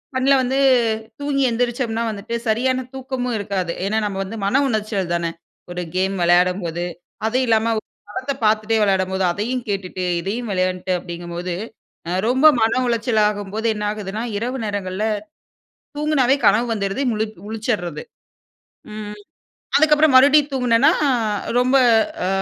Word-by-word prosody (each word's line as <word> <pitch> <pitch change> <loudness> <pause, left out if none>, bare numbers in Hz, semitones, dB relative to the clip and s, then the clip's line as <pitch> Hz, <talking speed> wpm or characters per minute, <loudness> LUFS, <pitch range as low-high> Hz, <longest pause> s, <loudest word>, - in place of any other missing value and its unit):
கண்ணுல 265 +2 +3
வந்து 260 +2 0 0.6
தூங்கி 285 -1 -1
எந்திரிச்சோம்னா 235 -1 -1
வந்துட்டு 215 +3 -5
சரியான 255 +3 +1
தூக்கமும் 255 -2 -3
இருக்காது. 190 -4 -2
ஏன்னா, 215 +2 +1
நம்ம 195 -2 -3
வந்து 215 +4 -7
மன 260 +8 +3
உளச்சல் 210 -6 -2
தான, 170 -1 -1 0.4
ஒரு 180 0 -4
கேம் 190 +1 0
விளையாடும்போது. 175 -1 +2 0.4
அது 235 +3 0
இல்லாம, 225 0 +2
ஒரு - - -23 0.2
படத்த 260 +6 -3
பாத்துட்டே 215 +1 +2
விளையாடும்போது 190 -1 +1
அதையும் 235 +6 -3
கேட்டுட்டு, 185 -2 -3 0.2
இதையும் 220 +6 -4
விளையாண்ட்டு 185 0 -1
அப்டீங்கும்போது, 175 0 -5 0.5
அ, - - -3 0.2
ரொம்ப 265 +5 +5
மன 225 +3 +2
உளச்சல் 230 -1 +1
ஆகும்போது 210 +2 -3
என்ன 210 0 -3
ஆகுதுனா, 210 +1 -5 0.2
இரவு 250 +4 -3
நேரங்கள்ல 200 -1 -3 0.9
தூங்கனாவே 285 -3 +2
கனவு 220 +5 +3
வந்துறுது, 200 +4 -2
முழிப் 215 0 -3
முழிச்சிட்றது. 210 -8 -3 0.9
ம், 210 -1 -7 0.6
அதுக்கப்பறம், 305 -1 +4
மறுபடியும் 285 +2 +6
தூங்குனேன்னா, 250 0 +4 0.7
ரொம்ப 255 +2 +3 0.5
அ, - - 0
215 Hz, 130 wpm, -21 LUFS, 190-250 Hz, 0.9 s, மறுபடியும்